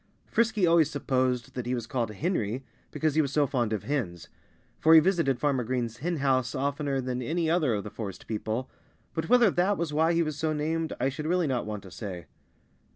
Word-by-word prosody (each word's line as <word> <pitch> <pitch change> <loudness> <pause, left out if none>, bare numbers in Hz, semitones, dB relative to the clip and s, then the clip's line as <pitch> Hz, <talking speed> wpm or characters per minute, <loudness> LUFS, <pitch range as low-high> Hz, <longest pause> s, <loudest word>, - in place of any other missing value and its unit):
Frisky 220 -4 +2
always 165 -3 +4
supposed 130 -4 -1
that 125 -2 -4
he 125 - 0
was 120 -2 -4
called 120 -2 -2
"Henry" 125 - -2 0.3
because 155 -2 0
he 155 - +4
was 140 -3 -2
so 145 0 +3
fond 120 -4 -1
of 105 -4 -2
hens 105 - -3 0.5
for 160 +1 +6
he - - +11
visited 165 -7 +2
Farmer 135 -3 +1
Green's 120 -1 -2
hen 175 +4 -2
house 130 -3 +1
oftener 140 0 -1
than 125 -1 -3
any 160 +5 0
other 155 -9 +2
of 100 - -3
the 105 - -7
forest 100 -4 -7
people 110 +3 -3 0.5
but 160 +2 -3
whether 240 -4 +6
that 190 +4 +1
was 165 -3 -2
why 160 +3 +3
he 170 0 +3
was 155 -2 -3
so 155 +1 -1
named 160 +2 -1
I 130 - +2
should 150 +3 -5
really 180 0 +2
not 130 -6 -1
want 105 -2 -5
to 95 - -12
say. 95 -4 -6
140 Hz, 215 wpm, -28 LUFS, 120-160 Hz, 0.5 s, he